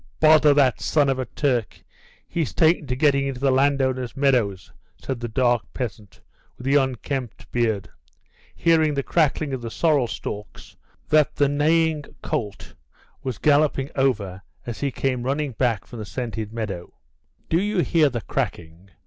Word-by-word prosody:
"Bother 155 -1 +6
that 135 -5 +3
son 145 -3 +2
of 135 -1 0
a 130 - -1
Turk; 125 -8 -2 0.4
he's 165 -4 -2
taken 160 -2 +3
to 125 - -1
getting 140 0 +2
into 135 -2 -4
the 135 0 +2
landowner's 130 -2 +1
meadows," 120 -9 +1 0.3
said 130 -3 -5
the 120 - -4
dark 120 +1 +2
peasant 105 -5 -6 0.4
with 125 - -10
the 135 - +2
unkempt 130 -4 -1
beard, 110 -5 0 0.7
hearing 160 -3 +3
the 140 - -1
cracking 155 -2 +1
of 130 - -3
the 115 - -5
sorrel 145 -1 +2
stalks 105 -1 -7 0.3
that 155 -1 +3
the 145 - +3
neighing 155 +2 +2 0.2
colt 105 -3 -4 0.5
was 130 -5 -4
galloping 145 -1 +2
over 105 -9 0 0.2
as 120 -2 -6
he 140 - 0
came 130 -1 -1
running 140 +3 -1
back 115 -4 0
from 120 - -10
the 105 - -5
scented 110 -2 -5
meadow. 105 -6 -5 0.5
"Do 165 +2 +2
you 205 -2 +1
hear 160 -4 +3
the 120 -3 -4
cracking? 85 +1 -4
130 Hz, 155 wpm, -23 LUFS, 115-145 Hz, 0.7 s, Bother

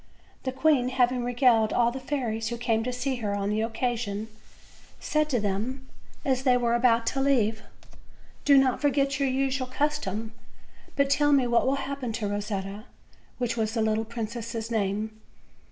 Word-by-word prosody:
The 260 - 0
queen, 265 -2 +2
having 250 -1 +1
regaled 240 -3 +3
all 240 -1 +3
the 265 - -5
fairies 245 -5 -2
who 235 +1 -3
came 230 -1 0
to 250 - -1
see 250 +1 -2
her 210 -4 -2
on 200 0 -1
the 215 +1 0
occasion, 225 -2 -2 0.7
said 305 -1 0
to 250 -5 +1
them 220 +7 -3 0.4
as 260 -2 +1
they 255 -2 +4
were 235 -1 +1
about 235 -1 +3
to 270 +3 0
leave: 225 -6 +2 0.8
"Do 280 -1 +6
not 265 -2 +3
forget 275 -1 +1
your 275 -1 +2
usual 265 0 0
custom, 255 -6 -2 0.6
but 280 -1 +3
tell 290 +1 +3
me 275 -3 +4
what 235 +1 +2
will 270 - +3
hap 275 0 -4
pen 240 -3 -3
to 215 -2 -2
Rosetta," 205 0 -4 0.5
which 245 -2 -1
was 220 0 -1
the 225 - +1
little 220 0 +1
princess' 230 0 -5
name. 215 +1 -2
240 Hz, 170 wpm, -27 LUFS, 220-265 Hz, 0.8 s, Do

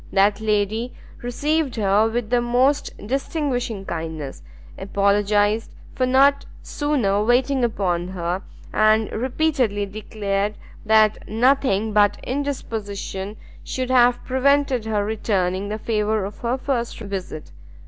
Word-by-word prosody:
That 200 +2 +3
lady 215 +3 0 0.3
received 285 +3 -1
her 210 0 +3
with 230 -1 -3
the 245 -1 +3
most 255 +4 +2 0.2
distinguishing 250 -5 -2
kindness; 160 -5 -5 0.3
apologised 205 +2 +1 0.2
for 255 - 0
not 275 +2 +4 0.2
sooner 240 -10 0
waiting 250 +3 +2
upon 180 -7 0
her, 180 0 -3 0.3
and 215 0 +3
repeatedly 250 -4 0
declared 205 0 -3 0.3
that 215 -1 +3
nothing 225 -3 +2
but 205 -1 +4
indisposition 215 -7 -4 0.3
should 255 0 -3
have 245 -1 +4
prevented 265 -2 +2
her 210 -2 0
returning 200 -3 -1
the 215 - -3
favour 215 -2 0
of 200 - -8
her 240 +2 -1
first 255 -3 -2
visit. 195 -7 -6
220 Hz, 115 wpm, -22 LUFS, 200-255 Hz, 0.3 s, not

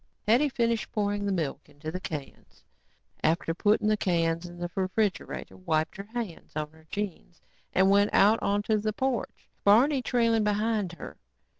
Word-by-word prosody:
Hetty 250 +7 +4
finished 230 -3 0
pouring 205 -1 -1
the - - 0
milk 165 -7 -3
into 155 +2 -7
the 185 - -4
cans 150 -6 -8 0.6
and 155 - +4
after 165 -1 -3
putting 210 +4 +2
the 215 - +4
cans 170 -3 0
in 175 0 -11
the 175 0 -4
refrigerator, 195 +2 -2
wiped 160 -3 -1
her 200 +1 -7
hands 225 -9 -5
on 150 -1 -3
her 160 0 -21
jeans 195 -4 -5 0.3
and 190 +1 +4
went 200 +1 +4
out 215 +3 +5
onto 205 +2 +1
the 215 +1 -1
porch, 260 +1 -2 0.2
Barney 255 +7 +5
trailing 230 -3 +2
behind 210 -2 0
her. - - -9
200 Hz, 165 wpm, -28 LUFS, 170-220 Hz, 0.6 s, out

